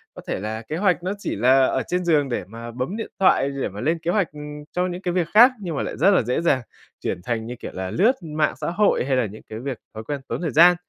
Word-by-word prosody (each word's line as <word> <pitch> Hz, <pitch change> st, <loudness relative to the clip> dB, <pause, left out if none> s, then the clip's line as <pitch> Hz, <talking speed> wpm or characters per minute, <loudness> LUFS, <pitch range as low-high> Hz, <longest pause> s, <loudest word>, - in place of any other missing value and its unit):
Có -, -, -9 dB
thể -, -, -2 dB
là 110 Hz, +3 st, -4 dB
kế 150 Hz, +8 st, -5 dB
hoạch 180 Hz, -2 st, +2 dB
nó 185 Hz, -, -1 dB
chỉ -, -, -3 dB
là 130 Hz, +5 st, +5 dB
ở 130 Hz, -, 0 dB
trên 180 Hz, 0 st, -1 dB
giường 145 Hz, -5 st, +3 dB
để 120 Hz, -, -2 dB
mà 115 Hz, +2 st, -8 dB
bấm 125 Hz, -, -3 dB
điện 225 Hz, -, -4 dB
thoại, 160 Hz, -7 st, +4 dB
để 140 Hz, -1 st, -3 dB
mà 100 Hz, +2 st, -8 dB
lên 160 Hz, +5 st, +1 dB
kế 165 Hz, +2 st, -1 dB
hoạch, 195 Hz, -7 st, +1 dB
ừm, 150 Hz, 0 st, -8 dB
cho 180 Hz, +1 st, 0 dB
những 180 Hz, 0 st, -5 dB
cái 180 Hz, -2 st, -2 dB
việc 175 Hz, -3 st, +1 dB
khác, 240 Hz, +5 st, +9 dB
nhưng 170 Hz, -4 st, -4 dB
mà -, -, -1 dB
lại -, -, -5 dB
rất 200 Hz, -, +5 dB
là 195 Hz, -, +4 dB
dễ 125 Hz, +7 st, 0 dB
dàng 140 Hz, -7 st, +2 dB, 0.4 s
chuyển -, -, -3 dB
thành, 115 Hz, -1 st, -2 dB
như 120 Hz, +2 st, -6 dB
kiểu -, -, -8 dB
là, 95 Hz, 0 st, -4 dB
lướt 215 Hz, +8 st, +4 dB
mạng 155 Hz, -2 st, -1 dB
xã -, -, -1 dB
hội 200 Hz, -7 st, +2 dB
hay 135 Hz, -, +1 dB
là 125 Hz, -2 st, +2 dB
những 105 Hz, +1 st, -9 dB
cái 110 Hz, -, -6 dB
việc, 130 Hz, 0 st, -4 dB, 0.2 s
thói 110 Hz, 0 st, -7 dB
quen 145 Hz, +4 st, -4 dB
tốn -, -, -3 dB
thời 165 Hz, -, -1 dB
gian. 175 Hz, +3 st, +7 dB
150 Hz, 290 wpm, -23 LUFS, 120-180 Hz, 0.4 s, khác